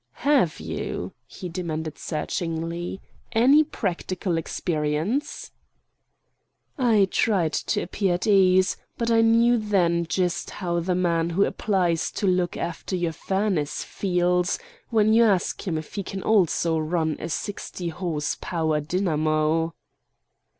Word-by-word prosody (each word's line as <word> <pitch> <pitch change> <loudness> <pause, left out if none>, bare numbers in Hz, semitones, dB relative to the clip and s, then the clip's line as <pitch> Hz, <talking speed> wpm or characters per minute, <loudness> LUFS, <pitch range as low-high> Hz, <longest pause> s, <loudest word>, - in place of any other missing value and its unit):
"Have 270 - +3
you," - - -4
he 185 - -8
demanded 160 -3 -4
searchingly, 165 +2 -3 0.3
"any 265 +7 +6
practical 185 - -3
experience?" 160 - -2 1.2
I 225 -7 +3
tried 180 -8 +1
to - - -1
appear 185 0 0
at 175 - -3
ease; 185 -3 +4 0.2
but 230 0 0
I 225 0 +5
knew 230 +1 +4
then 175 -5 +1
just 175 +2 -1
how 175 -3 -2
the 180 +2 -1
man 170 -2 +1
who 190 +4 +2
applies 180 -5 0
to - - -2
look 180 -2 +1
after 175 +2 -4
your 175 -2 -1
furnace 190 -4 -1
feels, 180 -1 0 0.3
when 220 -2 +3
you 230 +1 +6
ask 200 -1 +1
him 165 -3 0
if 155 - -7
he 200 - -2
can 190 0 -6
also 170 -5 +2
run 160 -1 0
a 165 - -5
sixty 180 -1 -4
horse 160 -3 -2
power 160 -3 0
dynamo. 155 -1 0
180 Hz, 130 wpm, -25 LUFS, 165-200 Hz, 1.2 s, any